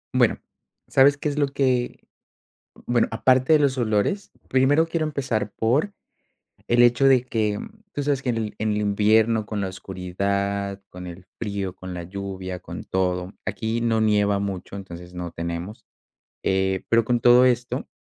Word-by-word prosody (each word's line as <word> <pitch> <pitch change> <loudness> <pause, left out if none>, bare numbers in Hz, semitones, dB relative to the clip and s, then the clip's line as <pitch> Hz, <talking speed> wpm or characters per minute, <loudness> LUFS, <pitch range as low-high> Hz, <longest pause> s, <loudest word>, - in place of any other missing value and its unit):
Bueno, - - +3 0.5
¿sabes 140 +1 +5
qué 150 - -3
es 150 0 -1
lo 145 - +3
que? 130 -3 -1 0.8
Bueno, 120 -1 +2
aparte 130 +5 +3
de 155 - +6
los 135 -2 +2
olores, 110 - 0 0.2
primero 140 +5 +3
quiero 165 -1 -1
empezar 130 -8 -2
por, 140 - +1 0.8
el 120 0 +5
hecho 120 +3 +5
de 130 -2 +5
que, 110 -4 -1 0.3
tú 145 - -3
sabes 140 -2 0
que 125 - 0
en 115 - -1
el 110 -2 -3
en 110 0 0
el 105 - 0
invierno 110 +2 +3
con 105 0 -4
la 95 - -1
oscuridad, 100 +2 -3
con 90 0 -9
el 90 +1 -10
frío, 100 -4 -3
con 95 -1 -8
la 85 -1 -5
lluvia, 95 -1 -6
con - - -8
todo, 90 0 -1
aquí 115 +1 -2
no 115 -1 +2
nieva 105 -2 +2
mucho, 100 -1 -4
entonces, 90 -2 -9
no 90 -1 -6
tenemos, 85 +5 -5 0.6
eh, 95 0 +1
pero 115 -1 +4
con 120 0 +1
todo 120 +2 +6
esto, 125 -1 0
110 Hz, 165 wpm, -24 LUFS, 95-125 Hz, 0.8 s, de